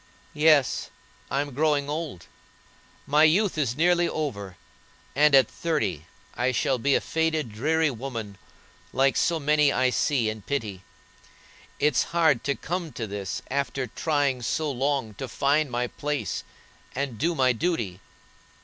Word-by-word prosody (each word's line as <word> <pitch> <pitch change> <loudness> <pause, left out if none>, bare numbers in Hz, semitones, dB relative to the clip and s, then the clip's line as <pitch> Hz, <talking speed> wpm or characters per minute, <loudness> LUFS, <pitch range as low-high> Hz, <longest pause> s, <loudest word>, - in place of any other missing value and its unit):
"Yes, 150 -5 +3 0.4
I'm 140 +1 -2
growing 145 0 +1
old; 150 - -5 0.8
my 150 +2 +4
youth 185 +6 +4
is 135 -6 0
nearly 175 +1 +3
over, 100 - -4 0.6
and 150 0 +5
at 130 -4 +6
thirty 100 - -2 0.3
I 125 +2 0
shall 130 +2 0
be 140 +3 +2
a - - +4
faded, 160 -6 -1
dreary 155 +7 +1
woman, 115 -5 -6 0.5
like 135 +2 +3
so 170 -1 +1
many 150 0 +3
I 130 -2 +2
see 125 -3 +1
and 110 -1 -4
pity. 110 -10 -3 1.0
It's 150 -3 +2
hard 155 -7 +3
to 140 - +1
come 175 -1 -4
to 115 - -4
this 100 -2 -5
after 140 -1 -1
trying 140 +1 0
so 150 +5 -1
long 135 -3 -1
to 135 - -4
find 140 +4 +1
my 125 0 -1
place, 145 - -3 0.5
and 130 -4 -3
do 170 +3 +1
my 130 -3 +3
duty. 115 - -2
140 Hz, 140 wpm, -26 LUFS, 120-155 Hz, 1.0 s, at